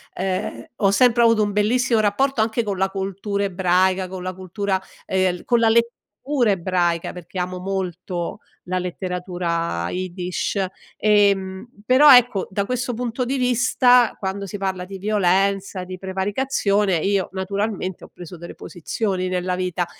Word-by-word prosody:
ehm, 185 -11 -3
ho 195 -3 +3
sempre 235 +3 +4
avuto 230 -2 +4
un 205 - -1
bellissimo 225 +3 +2
rapporto 235 +6 +1
anche 225 +2 0
con 200 -3 -3
la 190 +1 +2
cultura 195 +1 -3
ebraica, 185 0 +1
con 185 0 -7
la 185 0 -3
cultura, 190 +1 -2 0.3
ehm, 185 -2 0
con 240 -1 +3
la 230 - +4
lettura 235 +2 0
ebraica, 175 -2 0
perché 180 +1 -8
amo 180 0 -3
molto 180 -2 -4 0.3
la 185 0 0
letteratura 175 - -3
Iddish, 185 +1 -2 0.3
ehm, 200 -1 +2 0.2
però 260 +3 +8
ecco, 240 -6 +3
da 200 +1 -1
questo 250 +1 -2
punto 245 +1 -2
di 265 +3 -1
vista, 245 0 +4
quando 195 0 -3
si 200 - -6
parla 190 -2 -3
di 195 +1 -8
violenza, 195 -1 +1
di 185 0 -7
prevaricazione 200 0 0
io 195 +3 0
naturalmente, 195 -1 -3
ho - - -16
preso 175 0 -10
delle 170 +1 -9
posizioni 185 +2 -3
nella 180 0 -1
vita 180 -1 -1
195 Hz, 145 wpm, -22 LUFS, 180-215 Hz, 0.3 s, però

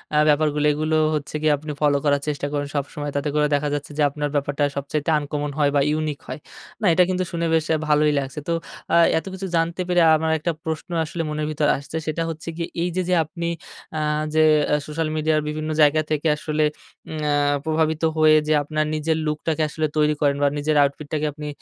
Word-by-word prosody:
আ - - +4
ব্যাপারগুলি, 150 0 +2
এগুলো 155 +1 -1 0.2
হচ্ছে 150 +1 -5
গিয়ে 155 -1 +3
আপনি 150 +1 -7
ফলো 145 -1 +3
করার 140 -1 +2
চেষ্টা 145 -1 -2
করেন 145 -1 -1
সবসময়। 145 +1 -3
তাতে 145 +1 -1
করে 150 0 +3
দেখা 145 +1 +1
যাচ্ছে 145 +1 -4
যে 155 - +1
আপনার 145 +1 -3
ব্যাপারটা 145 +1 0
সবচাইতে 145 +2 -2
আনকমন 145 0 -3
হয় 145 - +4
বা 140 - +4
ইউনিক 155 -1 -1
হয়। - - -6 0.4
না, - - 0
এটা 180 - +5
কিন্তু 185 0 0
শুনে 170 0 -1
বেশ 160 -1 +2
আ - - +1
ভালোই 150 0 +3
লাগছে। 135 +2 -5
তো 170 - +1 0.4
আ - - +6 0.2
এতকিছু 190 +3 -5
জানতে 165 +2 0
পেরে 175 -1 +3
আমার 160 +1 0
একটা 170 +3 -1
প্রশ্ন 160 +3 -4 0.2
আসলে 165 +2 -4
মনের 150 0 -2
ভিতর 150 -1 0
আসছে, 140 +3 -6
সেটা 155 +2 -1
হচ্ছে 165 +1 -6
কি? 170 - -2 0.2
এই 175 - 0
যে, 185 - +1
যে - - +3
আপনি 170 +2 -5 0.5
আ - - 0 0.3
যে 155 - +4 0.3
এ - - +5
সোশ্যাল 155 +1 -2
মিডিয়ার 155 0 +1
বিভিন্ন 155 +1 -3
জায়গা 150 +1 +5
থেকে 155 +1 0
আসলে, 155 0 -1 0.5
উম 160 - -5
অ্যা 150 - +1 0.3
প্রভাবিত 160 0 0 0.2
হয়ে 155 0 +6
যে 155 - +3
আপনার 155 +1 -1
নিজের 160 +1 0
লুকটাকে 155 +1 -1
আসলে 155 0 -1
তৈরি 150 0 +3
করেন 140 -1 +2
বা - - +5
নিজের 150 +1 0
আউটফিটটাকে 150 +2 -2
আপনি 150 0 -7
155 Hz, 210 wpm, -22 LUFS, 145-160 Hz, 0.5 s, আ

